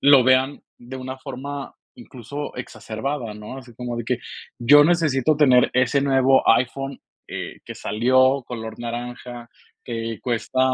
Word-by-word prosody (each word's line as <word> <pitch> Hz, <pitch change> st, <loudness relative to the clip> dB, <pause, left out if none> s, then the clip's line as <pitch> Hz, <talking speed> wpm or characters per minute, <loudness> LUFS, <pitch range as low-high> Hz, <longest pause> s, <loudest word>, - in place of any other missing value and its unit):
lo 140 Hz, -2 st, +7 dB
vean 130 Hz, +2 st, +3 dB, 0.2 s
de 125 Hz, +2 st, -9 dB
una 130 Hz, 0 st, -6 dB
forma, 135 Hz, +1 st, -7 dB, 0.2 s
incluso, 130 Hz, +4 st, -7 dB
exacerbada, 120 Hz, 0 st, -5 dB
¿no? 105 Hz, +5 st, -8 dB
Así 120 Hz, -3 st, -13 dB
como 120 Hz, 0 st, -5 dB
de 120 Hz, -, -4 dB
que: 125 Hz, +1 st, -1 dB, 0.4 s
"Yo 145 Hz, +5 st, +7 dB
necesito 155 Hz, -4 st, +2 dB
tener 130 Hz, -4 st, +5 dB
ese 125 Hz, +2 st, +3 dB
nuevo 135 Hz, -1 st, +3 dB
iPhone, 135 Hz, +3 st, +1 dB, 0.3 s
eh, -, -, -6 dB
que -, -, -8 dB
salió 130 Hz, +4 st, +2 dB
color 110 Hz, -2 st, -7 dB
naranja, 120 Hz, 0 st, -6 dB, 0.4 s
que 115 Hz, -2 st, -4 dB
cuesta 125 Hz, +2 st, -1 dB
130 Hz, 140 wpm, -22 LUFS, 120-135 Hz, 0.4 s, lo